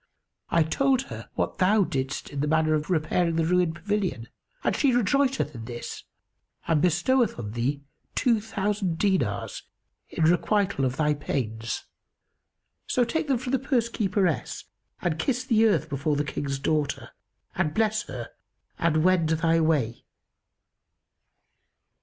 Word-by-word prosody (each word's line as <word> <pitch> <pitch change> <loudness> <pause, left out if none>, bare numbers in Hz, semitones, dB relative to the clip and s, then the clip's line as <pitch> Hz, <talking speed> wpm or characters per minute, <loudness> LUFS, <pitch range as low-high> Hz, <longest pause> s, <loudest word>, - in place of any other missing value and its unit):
I 165 - +4
told 265 - +2
her - - -9
what - - -2
thou 200 +3 +4
didst 135 -4 -3
in 140 - -5
the 150 - 0
matter 155 0 +2
of 150 +1 -1
repairing 165 0 +1
the 165 -1 +2
ruined 175 -1 +2
pavilion, 185 - -2 0.3
and - - +1
she 275 -3 +3
rejoiceth 270 +3 +2
in 115 -3 -8
this 120 0 -7 0.6
and 160 -3 +3
bestoweth 185 +9 +2
on 105 -4 -5
thee 130 +5 -2 0.3
two 235 -5 +2
thousand 205 -4 -1
dinars 195 +1 0 0.5
in 165 - -2
requital 175 -2 +2
of 130 0 -2
thy 150 -1 +2
pains; 115 -6 -3 1.0
so 250 - +2
take 300 +6 -1
them 270 -3 +2
from 250 +1 -5
the 270 - +2
purse 255 -4 0
keeperess 195 -7 -1 0.4
and 160 -2 0
kiss 250 - 0
the 225 -3 +4
earth 215 - +1
before 145 +2 -1
the 145 +1 0
King's 140 -1 -3
daughter 140 -3 -1 0.4
and 160 -4 -1
bless 215 -1 +2
her - - -7 0.5
and 155 -2 +2
wend 180 -3 +3
thy 165 +1 +2
way." 150 -8 +1
165 Hz, 145 wpm, -26 LUFS, 150-215 Hz, 1.0 s, I